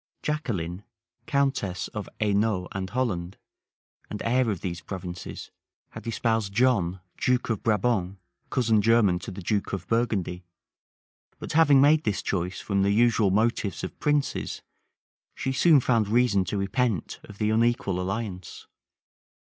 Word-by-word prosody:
Jacqueline, 105 - -3 0.4
countess 135 -10 0
of 105 -1 -6
Hainault 105 -3 +1
and 95 -1 -4
Holland, 100 -7 -2 0.7
and 105 - -5
heir 125 +1 +2
of 100 -5 -3
these 90 -1 -4
provinces, 90 -2 -7 0.4
had - - -10
espoused 110 -2 0
John, 100 -7 +2 0.2
duke 125 -2 +1
of 110 - -2
Brabant 105 -4 0 0.3
cousin 115 -4 +2
german 105 -5 +3
to - - -8
the 95 -1 -8
duke 100 +3 -1
of 95 -2 -3
Burgundy; 100 -6 -1 0.9
but - - -7
having 145 -3 +6
made 150 +2 +5
this 100 -2 -1
choice 90 -1 -2
from 100 -1 -1
the 100 - +2
usual 110 -1 +3
motives 105 0 0
of - - -6
princes, 145 -1 -1 0.7
she 135 - -2
soon 145 +3 +5
found 115 -4 +2
reason 110 -4 +3
to 95 +4 -3
repent 100 - -1
of 105 - -12
the 105 0 +1
unequal 110 -5 +1
alliance. 95 -1 -5
105 Hz, 140 wpm, -26 LUFS, 95-120 Hz, 0.9 s, having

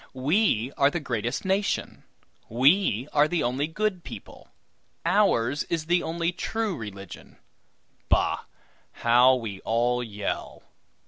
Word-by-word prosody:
We 135 - +1
are 140 - +5
the 175 - -3
greatest 120 - -3
nation. 195 +1 -1 0.5
We 130 - +3
are 150 0 +4
the 175 0 -1
only 130 +5 0
good 185 +1 -2
people. - - -11 0.6
Ours 145 - +2
is 165 -2 -2
the 175 +2 +2
only 170 +1 -1
true 215 +2 -2
religion. 100 -5 -9 0.7
Bah! - - +1 0.5
how 125 +2 +5
we 110 -6 -5
all 120 +3 0
yell! 105 -4 -5
140 Hz, 120 wpm, -26 LUFS, 120-175 Hz, 0.7 s, are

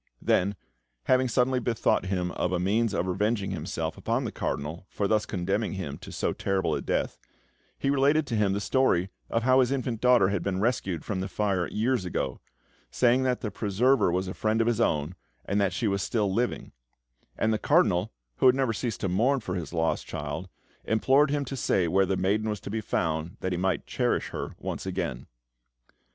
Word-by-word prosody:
Then, 100 +3 +1 0.5
having 130 0 +3
suddenly 125 +1 +2
bethought 115 -4 +1
him 90 -2 -1
of 90 - -1
a 90 - 0
means 105 +4 +1
of 90 - 0
revenging 100 +2 0
himself 80 -2 -4
upon 115 +4 0
the 115 - -3
Cardinal 80 +6 -4
for 100 - -1
thus 110 +1 +1
condemning 100 +3 -1
him 85 -7 -5
to - - -10
so - - -1
terrible 95 -2 0
a - - -1
death, - - -2 0.6
he 135 - 0
related 140 +3 +3
to 120 - -3
him 105 -3 +2
the 100 - -1
story 95 -8 +2 0.2
of 115 - 0
how 130 +1 +5
his 130 0 +3
infant 125 -4 -2
daughter 125 -6 +5
had 100 -2 -1
been 95 -2 -2
rescued 100 -7 -1
from 100 -3 -2
the 95 - -2
fire 100 -4 0
years 120 0 0
ago, 90 - -3 0.5
saying 125 +1 +3
that 130 -1 0
her 105 - -2
preserver 110 +3 +2
was 90 +2 -1
a 95 - -4
friend 110 +1 0
of 115 - +3
his 120 -1 +1
own, 75 -6 +1 0.3
and 100 +1 +1
that 100 -1 +2
she 110 +5 -1
was 100 -1 0
still 105 -2 0
living; 120 +4 -1 0.7
and 110 0 +2
the 110 - 0
Cardinal, 105 - +3 0.3
who - - +5
had 125 - +6
never 130 -4 +1
ceased 115 0 -3
to - - 0
mourn 120 +10 +2
for 95 -6 -5
his 85 -6 -4
lost 80 -1 -1
child, - - -5 0.3
implored 135 +6 +3
him 145 -1 0
to 135 - -5
say 95 -8 +1
where 95 +3 +3
the 95 - 0
maiden 105 +4 +1
was 105 -2 -2
to 100 - -7
be 110 +1 -2
found, 80 0 -2
that 95 - -2
he - - 0
might 95 +1 0
cherish - - 0
her - - -5
once - - -5
again. 85 -9 -3
105 Hz, 205 wpm, -27 LUFS, 95-120 Hz, 0.7 s, had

